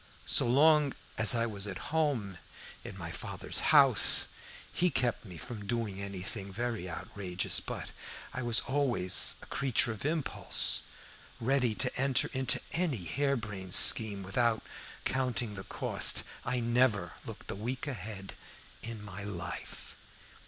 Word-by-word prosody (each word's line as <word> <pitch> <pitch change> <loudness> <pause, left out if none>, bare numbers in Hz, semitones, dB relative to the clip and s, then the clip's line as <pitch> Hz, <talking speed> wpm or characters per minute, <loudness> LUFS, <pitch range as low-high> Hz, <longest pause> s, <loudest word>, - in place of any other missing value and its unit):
So - - +3
long 145 +2 +4 0.2
as 110 +2 +5
I 115 0 +1
was 105 -3 -3
at 100 +7 -7
home 125 - 0 0.4
in - - -8
my - - -6
father's - - -1
house - - +7 0.4
he 180 +1 +2
kept 125 -6 -1
me 90 -4 -9
from 105 +4 -7
doing 110 -4 -2
anything 100 +1 -5
very 115 -3 -3
outrageous, 90 +2 -2
but - - -6 0.4
I 130 - -4
was 120 -2 +1
always 130 -9 +1
a - - -10
creature 130 -3 +1
of 110 - -7
impulse, 155 -1 +1 0.6
ready 125 -2 +1
to 130 - -1
enter 140 +2 +1
into 130 -1 +1
any 160 - -1
hair 140 - 0
brained 100 -6 -4
scheme 105 -3 +5
without 110 +4 0 0.4
counting 125 -4 0
the 95 -1 -8
cost. - - 0 0.2
I 125 +1 0
never 115 -6 +2
looked - - -8
a - - -4
week 120 +7 -4
ahead 105 -8 -6 0.5
in 115 -2 -6
my 100 0 -7
life. 100 -5 -7
115 Hz, 140 wpm, -31 LUFS, 100-130 Hz, 0.6 s, house